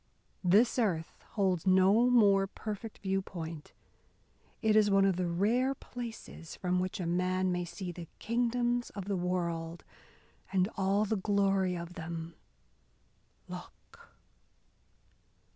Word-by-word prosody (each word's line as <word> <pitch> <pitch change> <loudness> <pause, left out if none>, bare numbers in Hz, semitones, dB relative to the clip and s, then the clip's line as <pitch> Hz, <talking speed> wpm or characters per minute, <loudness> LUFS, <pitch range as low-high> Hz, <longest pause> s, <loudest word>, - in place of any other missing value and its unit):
This 210 +8 +4
earth 175 -8 -1
holds 190 -4 +1
no 190 +6 +5
more 200 -5 +5
perfect 215 +2 -6
view 195 0 +1
point. 165 -4 -7 0.9
It 215 -1 +4
is 215 -1 +5
one 195 0 +4
of 195 -2 +3
the 180 0 -1
rare 230 +10 +1
places 230 -10 -8
from 180 0 0
which 185 +1 -2
a 180 - -2
man 185 +2 +1
may 180 0 -1
see 175 +2 -6
the 170 -1 -9
kingdoms 240 +1 0
of 200 -3 -5
the 200 0 -1
world 170 -2 -2 0.7
and 185 -1 +2
all 200 +1 +2
the 215 +1 0
glory 195 -2 +1
of 170 +1 -7
them. 165 -1 -6 1.1
Look!" - - -12
190 Hz, 125 wpm, -31 LUFS, 175-215 Hz, 1.1 s, no